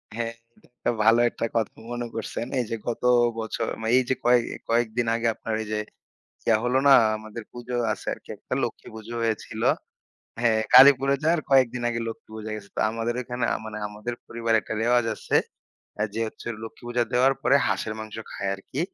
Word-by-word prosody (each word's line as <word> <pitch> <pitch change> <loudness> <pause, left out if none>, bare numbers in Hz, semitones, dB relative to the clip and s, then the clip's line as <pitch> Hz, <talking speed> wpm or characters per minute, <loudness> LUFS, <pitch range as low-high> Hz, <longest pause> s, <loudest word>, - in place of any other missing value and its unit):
হ্যাঁ, 115 0 -2 0.3
একটা 125 - -4
ভালো 115 +2 +6
একটা 115 - -3
কথা 115 -2 0 0.2
মনে 120 0 -3
করছেন। 115 +1 -4
এই 125 - 0
যে - - -1
গত 120 0 -3 0.4
বছর 110 0 -3
মানে 110 0 0
এই 130 - +4
যে 130 - +2
কয়ে 120 0 +6 0.3
কয়েকদিন 115 0 +1
আগে 115 0 0
আপনার 115 - -5
এই - - -10
যে 105 - 0 0.7
ইয়া 115 - +5
হলো 125 +2 +2
না - - +9 0.2
আমাদের 110 +1 -8
পুজো 120 0 -5 0.2
আছে - - -8
আরকি - - -22
একটা, - - -5
লক্ষ্মী - - -6
পুজো 110 +1 -8
হয়েছিল। 110 -2 -2 0.8
হ্যাঁ, 115 -2 +3
কালীপুরে 135 +1 +8
যাওয়ার 165 +2 +3
কয়েকদিন 125 -2 +4
আগে 115 -1 -2
লক্ষ্মী 115 +2 -9
পূজা 110 0 -6
গেছে। 100 -2 -10
তো - - 0
আমাদের 115 +1 -2
ওইখানে 125 -1 -3
আ - - 0
মানে 110 -1 -6
আমাদের 105 +3 -5
পরিবারে 115 -1 0
একটা 110 - -5
রেওয়াজ 120 +1 +3
আছে। - - 0 0.8
যে 115 - -2
হচ্ছে 110 - -10 0.2
লক্ষ্মী 115 +1 -10
পূজা 120 0 +1
দেওয়ার 130 +2 +4
পরে 140 - +5
হাঁসের 110 - -1
মাংস 110 -1 -7
খায় 100 - -3
আরকি। 100 +8 -6
115 Hz, 185 wpm, -25 LUFS, 110-125 Hz, 0.8 s, না